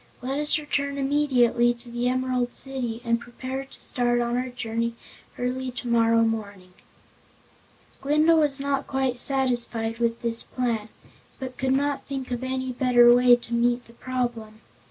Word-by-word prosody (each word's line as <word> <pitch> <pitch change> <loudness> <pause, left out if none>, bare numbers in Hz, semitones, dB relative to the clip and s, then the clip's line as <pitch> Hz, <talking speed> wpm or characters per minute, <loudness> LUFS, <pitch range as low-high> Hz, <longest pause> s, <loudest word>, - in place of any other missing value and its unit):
Let 270 +3 -2
us 295 +1 +3
return 280 -2 -2
immediately 255 -4 +2
to 235 0 -8
the 240 +1 0
Emerald 255 -1 -1
City 245 -4 -3
and 235 0 +1
prepare 260 +3 -6
to 270 - -14
start 240 -1 +1
on 240 0 0
our 255 +1 -1
journey 230 -1 -3 0.4
early 255 +1 -2
tomorrow 230 -2 +2
morning." 200 -5 -4 1.3
Glinda 305 +4 +4
was 295 -3 +1
not 275 0 -1
quite 265 -2 -1
satisfied 240 -4 +1
with 235 0 -1
this 230 0 +2
plan, 230 -4 -2 0.5
but 260 -2 -6
could 265 0 +1
not 285 +1 0
think 270 -2 -5
of 245 +1 -3
any 260 0 -2
better 245 -1 +5
way 245 0 +6
to 240 -1 -8
meet 240 +1 +1
the 230 - -18
problem. 235 -3 -4
245 Hz, 155 wpm, -25 LUFS, 235-265 Hz, 1.3 s, way